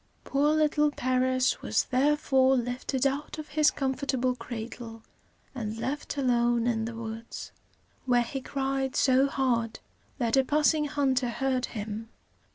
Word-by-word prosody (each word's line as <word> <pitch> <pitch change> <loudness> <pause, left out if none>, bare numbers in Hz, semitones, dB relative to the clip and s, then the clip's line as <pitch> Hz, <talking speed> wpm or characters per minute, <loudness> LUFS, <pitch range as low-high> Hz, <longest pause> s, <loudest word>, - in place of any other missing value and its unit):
Poor 290 +3 +2
little 300 -1 +3
Paris 255 -1 +1
was - - +1
therefore 265 -1 +3
lifted 245 +2 -2
out 275 +3 -1
of 310 -1 -7
his 305 0 +4
comfortable 265 -2 -1
cradle, 230 -1 -7 0.5
and 220 -4 -4
left 285 +5 -4
alone 240 -3 +2
in 225 -2 0
the 230 0 -5
woods, 225 0 -7 0.6
where 245 -1 +4
he 265 +3 -5
cried 270 0 -2
so 265 +1 +4
hard 240 -5 0 0.4
that 235 -3 +1
a 270 - +5
passing 300 +2 +2
hunter 265 -3 +1
heard 255 +1 -1
him. 220 0 -6
260 Hz, 135 wpm, -28 LUFS, 235-275 Hz, 0.6 s, a